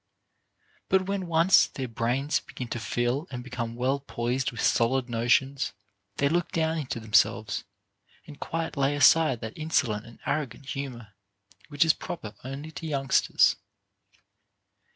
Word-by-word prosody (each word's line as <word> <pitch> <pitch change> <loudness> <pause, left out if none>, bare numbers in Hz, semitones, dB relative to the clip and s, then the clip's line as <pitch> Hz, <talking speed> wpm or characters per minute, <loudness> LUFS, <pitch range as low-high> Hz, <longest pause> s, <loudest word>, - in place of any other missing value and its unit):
But 190 -1 +3
when 195 -1 -2
once 170 +3 +5
their 130 -2 -5
brains 125 +5 0
begin 125 - -8
to 120 - -3
fill 120 - -1
and 125 -2 -6
become 120 -2 -5
well 130 +3 0
poised 125 -1 -2
with 120 - -9
solid 125 +1 +2
notions, 125 +4 +1 0.4
they 140 - +2
look 175 +4 0
down 160 0 0
into 130 -5 -4
themselves, 110 -1 +2 0.6
and 150 -2 -12
quite 165 0 -3
lay 140 0 +1
aside 145 -3 +5
that 110 0 -6
insolent 125 -9 0
and 115 - -14
arrogant 140 -3 -2
humor, 130 -5 -6 0.6
which 145 +1 +2
is 160 - +5
proper 110 -11 -7
only 135 +4 -6
to 160 - -7
youngsters. 135 -3 +3
135 Hz, 140 wpm, -27 LUFS, 120-155 Hz, 0.6 s, once